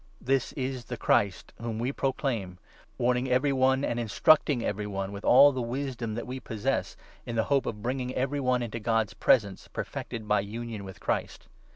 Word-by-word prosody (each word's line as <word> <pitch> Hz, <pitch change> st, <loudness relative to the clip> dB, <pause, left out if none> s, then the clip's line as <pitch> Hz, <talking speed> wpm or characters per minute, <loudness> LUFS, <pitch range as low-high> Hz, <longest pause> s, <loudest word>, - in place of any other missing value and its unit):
This 135 Hz, 0 st, 0 dB
is 130 Hz, -3 st, -3 dB
the -, -, -5 dB
Christ 100 Hz, -2 st, +1 dB
whom 115 Hz, -2 st, -3 dB
we 120 Hz, +4 st, -1 dB
proclaim, 125 Hz, -10 st, -2 dB, 0.4 s
warning 125 Hz, +1 st, +1 dB
every 130 Hz, +3 st, +2 dB
one, 130 Hz, +1 st, +3 dB
and 120 Hz, -, -1 dB
instruct 145 Hz, +9 st, +4 dB
ing 125 Hz, -5 st, 0 dB
every 105 Hz, 0 st, -2 dB
one, 95 Hz, -1 st, -3 dB
with 100 Hz, 0 st, -7 dB
all 140 Hz, +3 st, +8 dB
the 130 Hz, -2 st, -3 dB
wisdom 120 Hz, -2 st, -3 dB
that 120 Hz, -, -4 dB
we 130 Hz, +1 st, -5 dB
possess, 110 Hz, -3 st, -2 dB, 0.3 s
in 120 Hz, -, -5 dB
the 110 Hz, -, +2 dB
hope 140 Hz, -, +2 dB
of 105 Hz, -1 st, -5 dB
bringing 125 Hz, 0 st, -2 dB
every 135 Hz, +3 st, 0 dB
one 125 Hz, -2 st, +1 dB
into 115 Hz, 0 st, -4 dB
God's 115 Hz, -1 st, 0 dB
presence 100 Hz, -7 st, +2 dB
perfected 110 Hz, -2 st, -5 dB
by 105 Hz, 0 st, +3 dB
union 110 Hz, +1 st, -5 dB
with 95 Hz, -, -10 dB
Christ. -, -, -3 dB
120 Hz, 190 wpm, -28 LUFS, 110-130 Hz, 0.4 s, all